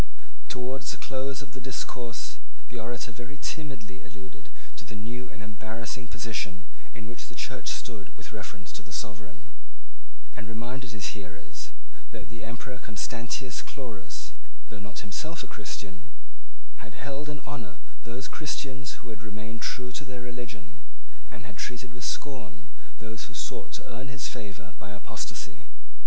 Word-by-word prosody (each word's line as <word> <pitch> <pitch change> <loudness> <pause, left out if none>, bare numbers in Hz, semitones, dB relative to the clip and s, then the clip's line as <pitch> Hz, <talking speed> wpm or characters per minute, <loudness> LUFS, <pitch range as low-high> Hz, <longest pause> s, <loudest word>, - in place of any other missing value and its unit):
Towards 125 0 +3
the - - +4
close 135 +1 +3
of 125 - -12
the 130 - -2
discourse 120 -1 +2 0.3
the 120 - +2
orator 120 +1 +2
very 120 +5 -3
timidly 130 -11 +1
alluded 95 -4 -7 0.3
to - - -2
the 105 0 -3
new 120 +3 0
and 110 - -4
embarrassing 110 +4 0
position 100 -5 +3 0.3
in 110 - -1
which 115 +1 -2
the - - -6
Church - - +2
stood - - +1
with - - -5
reference 95 -1 -2
to - - 0
the 100 - -10
sovereign, 105 -7 0 0.9
and 110 - -1
reminded 120 +3 +1
his 100 -2 +3
hearers 95 -5 -3 0.4
that - - -3
the 115 - -3
Emperor 125 +2 -1
Constantius 120 +3 +3
Chlorus, 115 -9 -2 0.4
though 105 - -2
not 100 0 -1
himself 155 - +2
a - - -3
Christian, 100 0 -1 0.7
had 110 -2 -5
held 140 +6 +1
in 150 - +2
honour 120 - -1 0.2
those 120 +3 0
Christians 135 -3 +2
who 115 - 0
remained 110 +1 -1
true 125 -1 +4
to 140 - +3
their 130 -2 -1
religion, 115 -10 -2 0.5
and 105 - -5
had 105 -2 -4
treated 125 0 +1
with 125 - -5
scorn 115 - +2 0.3
those 110 +1 -1
who 120 - -6
sought 115 - +2
to - - -7
earn 125 +3 -1
his 135 -1 +1
favour 100 -4 -2
by 100 - -2
apostasy. - - 0
115 Hz, 155 wpm, -35 LUFS, 105-130 Hz, 0.9 s, the